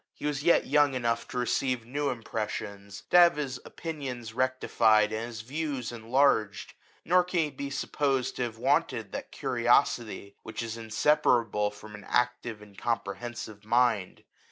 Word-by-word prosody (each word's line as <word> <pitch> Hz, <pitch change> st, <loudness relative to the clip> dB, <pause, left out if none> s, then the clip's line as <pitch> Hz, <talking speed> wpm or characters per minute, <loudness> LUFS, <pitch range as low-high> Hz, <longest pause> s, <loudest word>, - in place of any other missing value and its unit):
He -, -, -8 dB
was 150 Hz, -2 st, -1 dB
yet 170 Hz, +3 st, +4 dB
young 145 Hz, -2 st, +3 dB
enough 115 Hz, -2 st, -1 dB
to -, -, -6 dB
receive 125 Hz, -1 st, 0 dB
new 145 Hz, +4 st, -1 dB
impressions, 105 Hz, -4 st, -5 dB
to -, -, +7 dB
have 175 Hz, -3 st, +7 dB
his 140 Hz, -4 st, -3 dB
opinions 130 Hz, -8 st, -6 dB
rectified, 115 Hz, -4 st, +3 dB
and 110 Hz, +2 st, -3 dB
his 115 Hz, -2 st, -7 dB
views 140 Hz, 0 st, -3 dB
enlarged; 115 Hz, -2 st, +1 dB, 0.3 s
nor 180 Hz, +2 st, +4 dB
can 180 Hz, 0 st, -1 dB
he 155 Hz, -, 0 dB
be 140 Hz, +1 st, -5 dB
supposed 140 Hz, -1 st, -1 dB
to -, -, -3 dB
have 120 Hz, -2 st, -3 dB
wanted -, -, 0 dB
that -, -, -6 dB
curiosity 105 Hz, -3 st, +1 dB
which 110 Hz, -, -5 dB
is 115 Hz, -1 st, -4 dB
inseparable 115 Hz, -2 st, +2 dB
from 105 Hz, +1 st, -12 dB
an 105 Hz, -1 st, -10 dB
active 125 Hz, -3 st, -1 dB
and 100 Hz, -2 st, -15 dB
comprehensive 110 Hz, -1 st, -4 dB
mind. 115 Hz, -4 st, +1 dB
120 Hz, 155 wpm, -28 LUFS, 110-140 Hz, 0.3 s, to